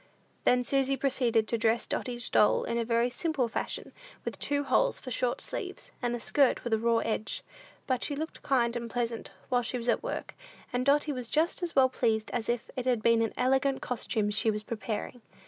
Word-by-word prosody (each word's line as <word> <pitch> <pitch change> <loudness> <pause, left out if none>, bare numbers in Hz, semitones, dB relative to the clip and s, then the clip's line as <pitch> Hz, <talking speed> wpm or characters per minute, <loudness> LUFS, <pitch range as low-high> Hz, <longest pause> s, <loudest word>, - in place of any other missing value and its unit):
Then 250 0 +4
Susy 275 +1 +1
proceeded 245 -5 +2
to 230 - -1
dress 225 +1 +2
Dotty's 240 -2 -2
doll 210 - +4
in 235 - -1
a - - +1
very 235 +1 +1
simple 280 -2 0
fashion, - - -3 0.3
with - - -4
two 285 0 +1
holes 260 -2 +2
for 255 - -8
short 245 0 0
sleeves, - - -6
and 240 -1 0
a - - -4
skirt 275 +3 +2
with 240 - -1
a 220 - +3
raw 230 0 +3
edge; 220 -1 -2 0.4
but 255 -2 0
she 290 - -1
looked 315 +3 -5
kind 240 -3 +2
and 235 -1 -3
pleasant 235 -1 -2 0.2
while 245 -1 +3
she 245 +1 -2
was 235 0 -5
at - - +2
work, - - -4 0.4
and 250 +2 0
Dotty 295 +2 +4
was 250 -4 -4
just 320 +8 +1
as 350 -1 -3
well 265 -1 +6
pleased 225 -4 0
as 240 -2 -2
if 240 -1 -2
it 255 -1 -3
had 240 -4 +2
been 230 -1 +4
an 225 - 0
elegant 265 +1 +2
costume 215 -3 -1
she 210 +2 +2
was 210 0 -1
preparing. 225 +2 -4
245 Hz, 210 wpm, -30 LUFS, 230-265 Hz, 0.4 s, well